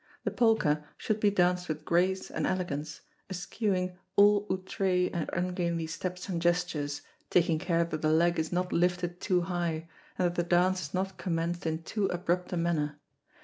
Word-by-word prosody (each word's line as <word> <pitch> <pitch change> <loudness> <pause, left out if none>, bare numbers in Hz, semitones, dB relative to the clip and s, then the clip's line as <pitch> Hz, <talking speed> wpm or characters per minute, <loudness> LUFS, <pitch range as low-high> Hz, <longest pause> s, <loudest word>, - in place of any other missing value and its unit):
The - - -1
polka 220 -11 +3 0.2
should 215 -1 -1
be 210 - +4
danced 180 -2 +2
with 155 -1 -4
grace 185 +2 +1
and - - -1
elegance, 155 -5 -3 0.3
eschewing 185 -1 -2 0.2
all 205 0 +5
outré 185 -1 0
and 170 -3 -2
ungainly 175 -2 -1
steps 180 +3 -5
and 175 -4 -2
gestures, 155 -4 0 0.3
taking 165 -2 +3
care 170 -1 +2
that 165 -2 -4
the 155 - +2
leg 170 +2 +3
is 160 0 -1
not 180 +1 -1
lifted 175 0 0
too 180 -3 +2
high, 170 -2 -2 0.3
and 180 - +2
that 175 - +1
the 175 - +1
dance 180 +2 +2
is - - -23
not 190 0 -2
commenced 170 -1 -1
in 160 +1 -2
too 205 +2 -1
abrupt 180 0 -1
a 180 - -1
manner. 150 -3 0
175 Hz, 175 wpm, -30 LUFS, 165-185 Hz, 0.3 s, all